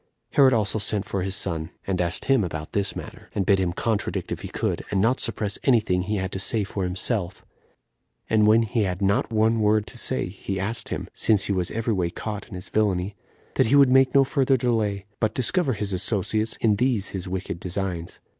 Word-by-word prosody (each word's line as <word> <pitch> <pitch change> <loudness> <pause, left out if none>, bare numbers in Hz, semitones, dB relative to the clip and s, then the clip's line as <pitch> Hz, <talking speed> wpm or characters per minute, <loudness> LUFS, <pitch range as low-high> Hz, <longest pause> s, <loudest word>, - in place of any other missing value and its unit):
Herod 135 -2 +5
also 110 -2 +1
sent 105 -1 -1
for 95 - -3
his 95 +1 -1
son, 85 -5 -1 0.2
and 95 -2 -1
asked 85 +1 -2
him 135 -5 +3
about 80 -3 -5
this 100 -1 0
matter, - - -9
and 95 - 0
bid 95 0 +3
him 90 -2 0
contradict 105 +4 -2
if - - -3
he - - -6
could, - - -2
and 100 - 0
not 115 +6 +2
suppress 105 -2 +1
any 125 -4 +5
thing 90 -4 0
he 105 +4 -2
had 95 -1 -2
to 95 - -4
say 105 +2 +1
for 100 0 -4
himself; 90 +1 -1 0.8
and 105 -1 +3
when 110 +2 +5
he 115 +1 -1
had 90 -3 -1
not 100 +3 +1
one 110 +1 +2
word 105 0 +2
to 120 - -5
say, 130 - +1
he 95 +1 -5
asked 110 +3 -2
him, - - -4
since 105 -3 +2
he 100 - 0
was 90 -2 -1
every 115 0 -1
way 90 -3 0
caught 105 +3 -6
in 105 - -9
his 90 +1 -7
villainy, 100 -2 0 0.4
that - - +2
he 135 - +3
would 140 -2 +6
make 135 +1 +4
no 135 - +7
further 135 -1 +2
delay, 110 -5 -1
but 110 -2 0
discover 135 +3 +1
his 105 -2 -3
associates 110 +3 +1
in 105 -3 +3
these 120 -4 +1
his 95 -1 -5
wicked 90 -2 -4
designs. 90 -2 -3
105 Hz, 220 wpm, -24 LUFS, 95-115 Hz, 0.8 s, no